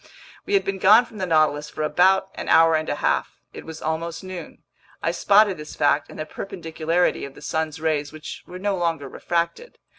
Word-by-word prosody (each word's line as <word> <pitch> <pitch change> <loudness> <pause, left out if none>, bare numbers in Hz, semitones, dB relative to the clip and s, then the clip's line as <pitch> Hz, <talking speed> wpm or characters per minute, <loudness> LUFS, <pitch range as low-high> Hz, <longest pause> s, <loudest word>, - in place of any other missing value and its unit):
We 405 - +2
had 395 - +2
been 195 -1 -2
gone 215 +6 +6
from 220 -3 -12
the 185 - -2
Nautilus 155 -2 +2
for 155 - -4
about 190 +5 +3
an - - -6
hour 165 0 +6
and 155 0 -1
a - - 0
half. - - -1 0.2
It - - -9
was 160 -1 -8
almost 165 +3 -3
noon. 185 -2 -9 0.4
I - - +1
spotted 205 -1 +4
this 150 0 -9
fact 145 0 +2
in - - -11
the 155 - -4
perpendicularity 165 -1 -2
of 140 -1 -8
the - - -13
sun's 160 +1 -2
rays, 155 -2 -1
which 155 0 -8
were 180 - -8
no 200 +1 -1
longer 165 -5 -1
refracted. 170 - -3
165 Hz, 205 wpm, -23 LUFS, 155-190 Hz, 0.4 s, gone